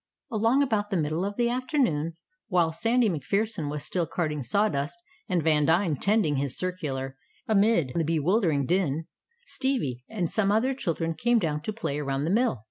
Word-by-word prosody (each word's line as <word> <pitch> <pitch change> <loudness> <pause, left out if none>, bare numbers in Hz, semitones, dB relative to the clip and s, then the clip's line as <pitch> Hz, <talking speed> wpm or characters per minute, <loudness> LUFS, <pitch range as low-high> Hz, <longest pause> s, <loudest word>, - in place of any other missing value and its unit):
Along 230 +5 +3
about 210 -6 0
the 195 - 0
middle 155 +2 -1
of 200 +1 -3
the 240 -1 +2
afternoon, 240 - 0 0.3
while 175 -4 +2
Sandy 230 +8 +2
MacPherson 195 - -1
was 150 0 -4
still 175 -3 -1
carting 150 -4 -2
sawdust, 145 - 0 0.3
and 180 -4 +1
Vandine 160 +2 +3
tending 195 -4 +2
his 135 -1 -2
circular 140 -8 -3 0.3
amid 205 - +3
the 170 - +1
bewildering 160 - +1
din, 165 -2 0 0.4
Stevie 245 - -2
and 185 -7 -2
some 200 -2 +2
other 235 +6 +2
children 165 -9 -2
came 240 +9 +2
down 155 -7 -1
to 215 - -3
play 200 -10 -3
around 140 -1 -2
the 160 - 0
mill. 230 - +2
175 Hz, 165 wpm, -27 LUFS, 150-220 Hz, 0.4 s, Along